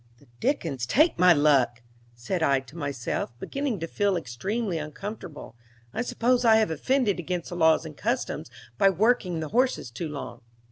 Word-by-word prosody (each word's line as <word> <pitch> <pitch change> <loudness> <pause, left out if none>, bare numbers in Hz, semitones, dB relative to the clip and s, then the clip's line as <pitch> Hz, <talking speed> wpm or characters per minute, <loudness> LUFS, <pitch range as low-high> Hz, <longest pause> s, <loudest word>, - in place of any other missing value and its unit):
"The 140 - -22
dickens 165 - -1
take 305 - +3
my 180 0 +7
luck!" 140 -6 +3 0.3
said 120 +10 -3
I 140 -4 +3
to 135 +3 -16
myself, 135 -6 -3
beginning 275 - -3
to 165 - -2
feel 200 +1 +1
extremely 180 - -3
uncomfortable. 155 - -8 0.4
"I - - -1
suppose 245 +1 +1
I 225 -2 +6
have 220 -5 +3
offended 210 - +1
against 175 0 -3
the 175 - -6
laws 160 -2 +4
and - - -8
customs - - -2 0.3
by 195 - +6
working 190 -3 +1
the 155 - -4
horses 250 - +1
too 155 +7 -5
long." 130 -4 -7
170 Hz, 170 wpm, -26 LUFS, 140-220 Hz, 0.4 s, my